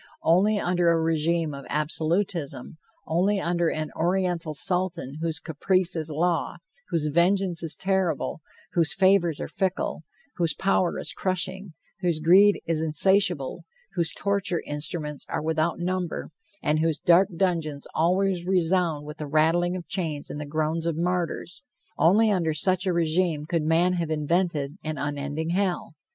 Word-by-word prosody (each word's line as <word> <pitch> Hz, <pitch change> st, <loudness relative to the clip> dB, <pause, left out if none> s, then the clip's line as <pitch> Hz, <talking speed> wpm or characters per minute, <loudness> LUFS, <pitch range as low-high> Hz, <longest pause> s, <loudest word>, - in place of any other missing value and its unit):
Only 190 Hz, +6 st, +3 dB
under 175 Hz, -2 st, +2 dB
a 165 Hz, -1 st, +3 dB
regime 160 Hz, 0 st, 0 dB
of 140 Hz, 0 st, -9 dB
absolutism, 160 Hz, +1 st, -2 dB, 0.3 s
only 190 Hz, +5 st, +1 dB
under 170 Hz, -2 st, 0 dB
an 155 Hz, -1 st, -3 dB
Oriental 175 Hz, -2 st, -1 dB
Sultan 175 Hz, -4 st, -1 dB
whose 165 Hz, -1 st, -1 dB
caprice 180 Hz, +3 st, +1 dB
is 160 Hz, -1 st, -2 dB
law, 165 Hz, +3 st, 0 dB, 0.3 s
whose 160 Hz, -2 st, 0 dB
vengeance 175 Hz, +2 st, +2 dB
is 160 Hz, -3 st, -3 dB
terrible, 185 Hz, -5 st, -1 dB, 0.3 s
whose 165 Hz, -3 st, +2 dB
favors 185 Hz, -5 st, +3 dB
are -, -, -4 dB
fickle, 190 Hz, -4 st, -2 dB, 0.4 s
whose 165 Hz, -4 st, 0 dB
power 190 Hz, -2 st, +1 dB
is -, -, -2 dB
crushing, 185 Hz, 0 st, -2 dB, 0.3 s
whose 175 Hz, -4 st, 0 dB
greed 190 Hz, +6 st, +5 dB
is 165 Hz, -1 st, 0 dB
insatiable, 165 Hz, -2 st, +2 dB, 0.3 s
whose 170 Hz, -2 st, +1 dB
torture 200 Hz, -4 st, -1 dB
instruments 150 Hz, 0 st, -3 dB
are -, -, -2 dB
without 160 Hz, +1 st, 0 dB
number, 180 Hz, -2 st, -3 dB, 0.3 s
and 150 Hz, +1 st, +1 dB
whose 160 Hz, -1 st, +1 dB
dark 180 Hz, +2 st, +4 dB
dungeons 165 Hz, -6 st, -1 dB
always 180 Hz, +2 st, +1 dB
resound 175 Hz, -4 st, +1 dB
with 150 Hz, +1 st, -8 dB
the 150 Hz, -, -5 dB
rattling 165 Hz, +4 st, +2 dB
of 180 Hz, -2 st, -6 dB
chains 160 Hz, -6 st, -2 dB
and 150 Hz, -, -5 dB
the 150 Hz, -, -6 dB
groans 160 Hz, +2 st, -1 dB
of 165 Hz, -2 st, -1 dB
martyrs 175 Hz, 0 st, -2 dB, 0.4 s
only 210 Hz, +6 st, +5 dB
under 165 Hz, -5 st, 0 dB
such 185 Hz, +4 st, +2 dB
a -, -, +3 dB
regime 165 Hz, -2 st, +1 dB
could 165 Hz, 0 st, 0 dB
man 165 Hz, +4 st, +2 dB
have 170 Hz, -3 st, -2 dB
invented 155 Hz, 0 st, -1 dB
an 155 Hz, -1 st, -4 dB
unending 145 Hz, +3 st, -3 dB
hell. 185 Hz, -3 st, -1 dB
170 Hz, 150 wpm, -25 LUFS, 155-185 Hz, 0.4 s, greed